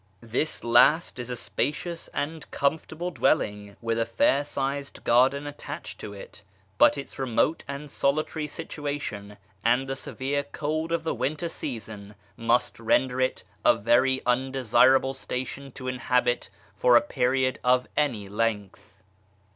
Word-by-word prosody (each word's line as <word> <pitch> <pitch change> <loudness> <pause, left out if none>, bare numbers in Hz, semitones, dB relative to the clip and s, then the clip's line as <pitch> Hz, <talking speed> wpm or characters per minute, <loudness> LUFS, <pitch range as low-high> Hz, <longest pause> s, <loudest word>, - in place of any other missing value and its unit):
This 120 +7 -2
last 150 +5 +4
is 120 0 -5
a 125 - -2
spacious 160 +7 -3
and 155 +2 -4
comfortable 160 +4 -1
dwelling, 105 - 0
with 115 0 0
a 115 - +2
fair 135 +4 +3
sized 140 -1 -4
garden 130 +4 +3
attached 145 - -7
to 105 - -7
it; 100 +1 -11 0.4
but - - +6
its 140 - -8
remote 135 +5 +1
and 140 +1 -6
solitary 155 +2 0
situation, 140 -9 -5 0.3
and 125 +3 +2
the 135 - -2
severe 135 +2 -2
cold 155 +3 -3
of 170 -1 0
the 160 - -1
winter 150 +7 -2
season, 110 -8 -7 0.2
must 115 +1 +1
render 125 +3 +2
it 130 - 0 0.2
a - - +6
very 130 +5 +2
un 130 +2 +1
desirable 130 +1 +4
station 135 +1 -5
to 130 - -7
inhabit 125 -1 0 0.3
for 120 +4 +6
a - - +5
period 130 -2 0
of 125 0 +3
any 120 -9 0
length. 105 -2 -3
130 Hz, 140 wpm, -26 LUFS, 115-145 Hz, 0.4 s, but